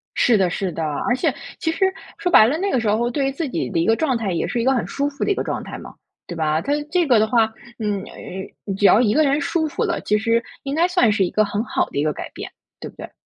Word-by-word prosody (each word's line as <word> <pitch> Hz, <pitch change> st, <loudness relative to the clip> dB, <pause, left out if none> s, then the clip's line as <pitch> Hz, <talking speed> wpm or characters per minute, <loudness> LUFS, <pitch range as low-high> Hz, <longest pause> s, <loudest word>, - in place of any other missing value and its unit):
是 235 Hz, -3 st, +4 dB
的， 185 Hz, -2 st, +2 dB
是 185 Hz, +1 st, -2 dB
的。 165 Hz, -, -4 dB
而 200 Hz, -, 0 dB
且 255 Hz, -, 0 dB, 0.3 s
其 320 Hz, -3 st, 0 dB
实 385 Hz, +4 st, +1 dB, 0.3 s
说 385 Hz, -4 st, -1 dB
白 215 Hz, -, +8 dB
了， 295 Hz, +6 st, 0 dB
那 390 Hz, +2 st, -1 dB
个 255 Hz, -, +2 dB
时 225 Hz, -, -2 dB
候 235 Hz, +3 st, +1 dB
对 275 Hz, +3 st, -1 dB
于 -, -, 0 dB
自 290 Hz, +2 st, -3 dB
己 -, -, -2 dB
的 175 Hz, -, -1 dB
一 165 Hz, -, +1 dB
个 225 Hz, -, +4 dB
状 270 Hz, -4 st, 0 dB
态 215 Hz, -4 st, -2 dB
也 -, -, -1 dB
是 240 Hz, -, -1 dB
一 -, -, -1 dB
个 265 Hz, -, +4 dB
很 245 Hz, -, 0 dB
舒 285 Hz, +1 st, -2 dB
服 280 Hz, -, -5 dB
的 -, -, +1 dB
一 395 Hz, -, +2 dB
个 -, -, -2 dB
状 -, -, -3 dB
态 -, -, -7 dB
嘛， -, -, -11 dB, 0.3 s
对 175 Hz, -, -6 dB
吧？ 155 Hz, 0 st, 0 dB
它 285 Hz, -, -1 dB, 0.2 s
这 355 Hz, -1 st, +2 dB
个 240 Hz, -4 st, +5 dB
的 220 Hz, -, +3 dB
话， 225 Hz, -1 st, +2 dB, 0.3 s
嗯， 205 Hz, -3 st, -2 dB
呃 190 Hz, +1 st, -8 dB
只 200 Hz, +1 st, 0 dB
要 205 Hz, -, +7 dB
一 215 Hz, -4 st, +2 dB
个 310 Hz, +5 st, +4 dB
人 280 Hz, +1 st, +2 dB
舒 330 Hz, +1 st, 0 dB
服 295 Hz, -, -2 dB
了， -, -, -1 dB
其 210 Hz, -, +1 dB
实 230 Hz, +2 st, +1 dB, 0.2 s
应 275 Hz, +1 st, -3 dB
该 340 Hz, +3 st, +3 dB
算 355 Hz, -, +3 dB
是 205 Hz, -2 st, +2 dB
一 -, -, -2 dB
个 215 Hz, 0 st, +2 dB
很 205 Hz, +1 st, -2 dB
好 -, -, 0 dB
的 -, -, -7 dB
一 145 Hz, -, +2 dB
个 155 Hz, -, +1 dB
改 -, -, -7 dB
变， -, -, -8 dB, 0.3 s
对 -, -, -7 dB
不 -, -, -18 dB
对？ -, -, -9 dB
235 Hz, 325 characters per minute, -21 LUFS, 205-285 Hz, 0.3 s, 白